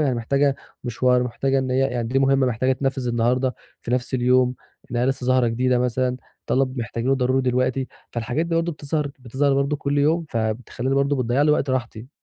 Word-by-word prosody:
يعني 140 -4 +2
محتاجة 140 +4 +1 0.3
مشوار، 125 +1 +2
محتاجة 135 +3 0
إن 130 -1 -2
هي 130 - +1
يعني 125 -3 0
دي 130 +3 +1
مهمَّة 135 -1 +3
محتاجة 125 +2 +1
تتنفّذ 135 -1 -2
النهارده 125 +2 +1 0.3
في - - -6
نفس 125 +1 -1
اليوم 125 0 +3 0.4
إن 120 - -3
هي 120 - +2
لسَّه 130 -1 -1
ظاهرة 130 -1 +3
جديدة 125 +2 +1
مثلًا، 125 +1 0 0.3
طلب 130 0 0
محتاجينه 120 +2 -1
ضروري 130 0 +1
دلوقتي، 130 +1 0 0.2
فالحاجات 120 +8 -2
دي 170 - -2
برضه 165 0 0
بتظهر 150 0 -2
بتظهر 135 +3 0
برضه 140 +2 +1
كل 145 0 -1
يوم، 160 +3 +2
فبتخلِّيني 115 +3 -2
برضه 140 +1 +2
بتضيِّع 125 +2 +1
لي 150 - +4
وقت 145 -2 +1
راحتي. 120 -2 -3
130 Hz, 190 wpm, -23 LUFS, 125-135 Hz, 0.4 s, لي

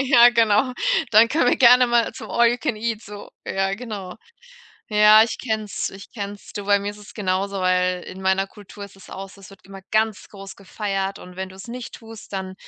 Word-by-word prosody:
Ja, 245 -3 +7
genau. 230 +1 +2 0.4
Dann 225 +2 +6
können 295 -5 +2
wir - - +2
gerne 250 0 +7
mal 235 -1 +1
zum - - -10
All-you-can-eat 235 -2 0
so. 205 -1 -11 0.2
Ja, 195 0 -1
genau. 205 -5 -7 0.7
Ja, 210 +1 +7
ich 225 - -2
kenne 220 -3 -2
es, 205 - -4
ich 195 +1 -12
kenne 200 -3 -5
es. 205 - -15
Du, 205 - -6
bei 200 0 +3
mir 200 +1 -4
ist 205 - -12
es 210 - -14
genauso, 195 -1 -2
weil 180 0 +1
in 185 - -10
meiner 190 +1 +1
Kultur 205 0 -12
ist 200 -1 -14
es 195 - -15
auch 195 +1 -7
so, 200 - -17
es 195 - -14
wird 195 - -16
immer 195 0 -11
ganz 215 -1 0
groß 195 -1 -11
gefeiert 195 -1 -4
und 180 0 -13
wenn 190 0 -4
du's 190 +3 -12
nicht 245 0 -7
tust, 225 -3 -12
dann, 190 -1 -5
205 Hz, 215 wpm, -22 LUFS, 195-225 Hz, 0.7 s, Ja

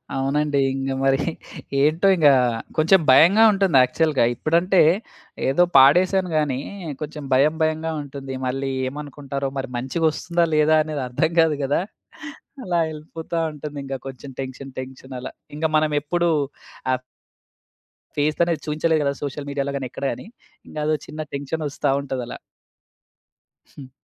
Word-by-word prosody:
అవునండి. 140 +2 0
ఇంగ 135 0 -3
మరి 135 +1 +3 0.6
ఏంటో 160 +6 +3
ఇంగ 155 -4 +5 0.5
కొంచెం 165 +5 +5
భయంగా 190 +11 +7
ఉంటుంది 195 -8 +2
యాక్చువల్‌గా. 145 +1 +1
ఇప్పుడంటే 170 +6 +2 0.7
ఏదో 175 +6 +4
పాడేసాను 180 +7 +5
గానీ, 140 -4 0 0.4
కొంచెం 150 -1 -6
భయం 150 +4 +4
భయంగా 160 +1 -1
ఉంటుంది. 135 -1 -7
మళ్ళీ 135 +1 -2 0.2
ఏమనుకుంటారో 140 -1 -5
మరి 135 -1 -3
మంచిగా 145 +6 0
ఒస్తుందా? 170 +2 0
లేదా? 155 +1 +4
అనేది 150 -3 -4
అర్థం 125 +6 0
కాదు 155 -3 +2
గదా! 140 +5 +1 0.8
అలా 175 -2 -1
వెళ్ళిపోతా 160 +2 -6
ఉంటుంది 150 0 -8
ఇంకా 135 -1 -4
కొంచెం 135 +1 -9
టెన్షన్, 135 +1 -6
టెన్షన్ 130 0 -9
అలా - - -6 0.3
ఇంకా 160 +1 0
మనం 155 0 +2
ఎప్పుడూ 175 +3 0 0.6
ఆ - - +3 1.2
ఫేసనేది 155 +3 +1
చూయించలేదు 155 +1 +1
కదా! 140 0 +1
సోషల్ 145 0 -5
మీడియా‌లో 140 0 -2
గాని 130 -2 -4
ఎక్కడ 140 - -8
గాని - - -10 0.4
ఇంగ - - -11
ఏదో 155 - +2
చిన్న 155 +1 -6
టెన్షనొస్తా 145 0 -2
ఉంటదలా. 130 -3 -5 1.4
హ్మ్. 135 -2 -10
150 Hz, 130 wpm, -22 LUFS, 135-160 Hz, 1.4 s, భయంగా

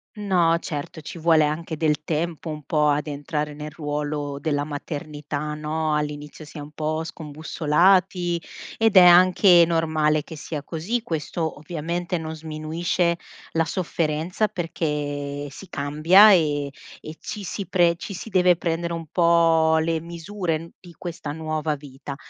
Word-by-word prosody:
No, 180 -5 +2
certo, 150 -1 -6
ci 155 +2 -8
vuole 160 -1 +4
anche 160 +2 -3
del 150 -1 +1
tempo 165 +1 -2
un 150 -1 -6
po' 150 +1 +2
ad 145 +1 0
entrare 150 +1 -3
nel 150 +1 -7
ruolo 145 -1 -3
della 145 -1 0
maternità, 150 0 -5
no? 155 +1 -1
All'inizio 150 0 -4
si 150 +2 -12
è - - -5
un 145 +1 -9
po' 155 +1 -2
scombussolati 170 +3 +1 0.4
ed 225 -3 +3
è 180 - +10
anche 180 0 +7
normale 155 -2 +1
che 160 - -9
sia 150 -1 -6
così; 175 +11 -2
questo 160 -3 -3
ovviamente 170 +3 -3
non 160 -1 -5
sminuisce 160 +2 -1 0.4
la 165 - +2
sofferenza 170 +3 -1
perché 145 -5 -3
si 180 +7 -12
cambia 160 +9 +6
e 145 -5 +1 0.3
e 155 - -9
ci 210 -1 -6
si 195 +2 -4
pre 175 -2 +3
ci 190 +4 -7
si 185 - -7
deve 180 -3 +4
prendere 170 0 -2
un 165 -1 -5
po' 165 -1 +4
le 160 0 0
misure 170 -1 -4
di 175 -2 -14
questa 165 -4 -6
nuova 155 0 -2
vita. 140 0 -9
160 Hz, 150 wpm, -24 LUFS, 150-170 Hz, 0.4 s, è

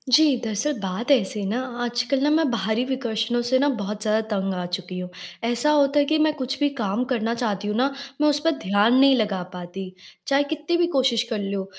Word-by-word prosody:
जी, 305 -3 +5
दरअसल 220 +7 -1
बात 195 +6 -4
ऐसी 215 -6 +2
है 200 - -3
ना 230 +5 -1 0.2
आजकल 245 +3 0
ना 295 - +3
मैं 315 -1 +3
बाहरी 220 +1 0
विकर्षणों 240 -2 -1
से 250 +2 +2
ना 285 - +3
बहुत 205 +1 -4
ज़्यादा 215 +1 +1
तंग 195 0 -1
आ 180 -1 -3
चुकी 180 +1 -5
हूँ। 180 0 -6 0.3
ऐसा 240 +5 +2
होता 290 -1 +3
है 285 - +3
कि 315 +2 +1
मैं 310 0 +3
कुछ 270 -2 -4
भी 290 -1 +2
काम 210 +2 0
करना 235 -3 -1
चाहती 210 -4 -2
हूँ 210 - -1
ना, 265 +3 +2 0.3
मैं 300 - +4
उस 295 0 +2
पे 330 - +3
ध्यान 205 +4 +3
नहीं 275 0 +6
लगा 210 -6 0
पाती, 180 +1 -7 0.3
चाहे 275 +1 +3
कित्ती 310 +3 -2
भी 345 0 +2
कोशिश 255 -3 +3
कर 225 -3 -2
लूँ। 195 -1 -3
235 Hz, 225 wpm, -23 LUFS, 205-275 Hz, 0.3 s, नहीं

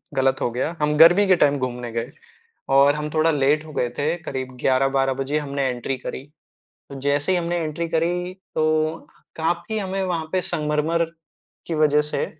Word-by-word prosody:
गलत 130 0 +1
हो - - +1
गया। 130 +8 -2
हम 150 0 +1
गर्मी 175 +6 +7
के 185 - +6
टाइम 145 -1 +3
घूमने 125 -2 -4
गए 115 +3 -4 0.7
और 140 +1 +6
हम 150 0 -4
थोड़ा 160 +1 +3
लेट 150 +1 +2
हो 155 - -10
गए 125 -4 -1
थे, 155 +4 0
करीब 130 -4 -5
11-12 135 0 +2
बजे 135 +3 -1
हमने 140 -2 -3
एंट्री 125 +1 -3
करी। 130 - -6 0.7
तो 140 - -8
जैसे 145 +4 +1
ही 185 - +3
हमने 175 0 -1
एंट्री 165 0 -3
करी, 175 +2 -1 0.2
तो 155 +1 +1 0.4
काफ़ी 170 +6 -2
हमें 195 0 -3
वहाँ 170 -4 -2
पे 185 - +1
संगमरमर 155 +1 0 0.6
की 165 - -2
वज़ह 150 -1 +4
से 150 - -2
150 Hz, 180 wpm, -22 LUFS, 135-165 Hz, 0.7 s, गर्मी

